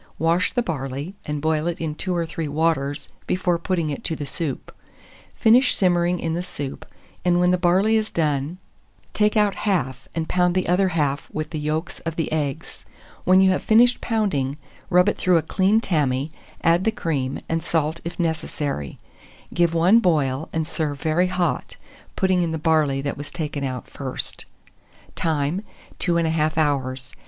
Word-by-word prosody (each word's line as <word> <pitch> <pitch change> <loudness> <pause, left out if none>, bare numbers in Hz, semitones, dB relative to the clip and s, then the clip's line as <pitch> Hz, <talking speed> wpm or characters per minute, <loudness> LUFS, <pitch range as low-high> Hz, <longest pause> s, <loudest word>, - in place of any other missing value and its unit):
Wash 170 +4 +2
the 245 - 0
barley, 140 - -4
and 150 -1 -3
boil 155 0 +1
it 175 - -2
in 160 -2 -2
2 180 +4 -2
or 170 -1 0
3 165 -1 -4
waters 145 -2 0 0.2
before 180 -2 +1
putting 170 -4 -1
it 140 - -5
to 160 - 0
the 145 - -5
soup; 140 -1 -5 0.6
finish 245 +4 +5
simmering 175 -1 +2
in 165 - -2
the 170 - -1
soup, 145 -7 -6 0.4
and 175 0 +3
when 180 0 +4
the - - +4
barley 190 +5 +3
is 215 0 -1
done, 150 0 -1 0.6
take 210 +1 +2
out 210 -2 +3
half, 160 - -1
and 160 -1 -2
pound 180 -1 +2
the 185 - +1
other 185 +2 +3
half 150 -5 -1
with 155 0 -4
the 155 - -3
yolks 155 +3 -2
of 165 -1 -5
the 165 - -2
eggs. 145 -4 -3 0.4
When 185 +1 +6
you 190 0 +5
have 185 - 0
finished 240 +3 +4
pounding, 155 - 0 0.3
rub 180 0 +5
it 210 - 0
through 180 -2 +4
a 160 - +1
clean 195 +6 +2
tammy, 150 - 0 0.3
add 170 +2 +4
the 225 - +2
cream, 140 -10 -2
and 165 0 -1
salt 160 0 -1
if 170 +2 -6
necessary; 150 - -2 0.6
give 170 -1 +2
one 180 +7 +5
boil, 155 - +1
and 160 -1 -1
serve 150 -3 -3
very 165 +3 +2
hot, 175 -7 -1 0.4
putting 185 -1 +2
in 170 -2 0
the - - -1
barley 155 -3 +2
that 140 0 -3
was 145 - -6
taken 150 -4 -4
out 130 -2 -4
first. 130 -2 -4 0.7
Time. 155 +2 0 0.4
2 175 - +1
1/2 160 -2 +1
hours. 135 -4 -1
165 Hz, 175 wpm, -23 LUFS, 145-180 Hz, 0.7 s, When